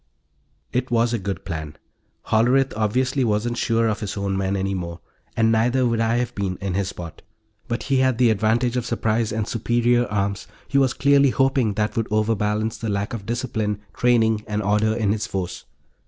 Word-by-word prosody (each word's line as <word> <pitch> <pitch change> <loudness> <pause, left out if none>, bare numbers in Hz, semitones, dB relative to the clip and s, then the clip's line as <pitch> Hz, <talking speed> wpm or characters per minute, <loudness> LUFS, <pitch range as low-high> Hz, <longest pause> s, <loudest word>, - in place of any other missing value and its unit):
It 125 +1 -1
was 120 0 +2
a 120 - 0
good 100 0 -5
plan. 80 -3 -5 0.5
Hollerith 125 +5 +3
obviously 130 +5 +1
wasn't 115 +1 0
sure 115 -1 +2
of 110 -2 -1
his 105 -1 -5
own 100 -1 -1
men 95 0 -1
any 95 0 -1
more 85 -2 -5 0.4
and 115 0 +4
neither 125 +3 +2
would 115 -1 +1
I 115 0 +2
have 125 0 -1
been, 95 -4 -3
in 95 -2 -3
his 100 0 0
spot. 85 -4 -9 0.5
But 120 - -2
he 135 - +1
had 130 -2 +2
the 120 -2 +4
advantage 110 +3 +1
of 125 -2 -1
surprise 115 -1 0
and 110 -1 -2
superior 120 +1 +1
arms; 100 -1 -2 0.2
he 140 - +2
was 130 -2 +2
clearly 140 0 +4
hoping 130 -5 +1
that 105 0 -1
would 115 -1 0
overbalance 110 0 0
the 115 - -3
lack 100 +4 -2
of 105 -4 -6
discipline, 115 -4 -2
training 110 -3 +2
and 105 0 -2
order 105 +2 +2
in 110 -3 +1
his 105 0 -1
force. 95 -3 -4
110 Hz, 190 wpm, -23 LUFS, 105-120 Hz, 0.5 s, and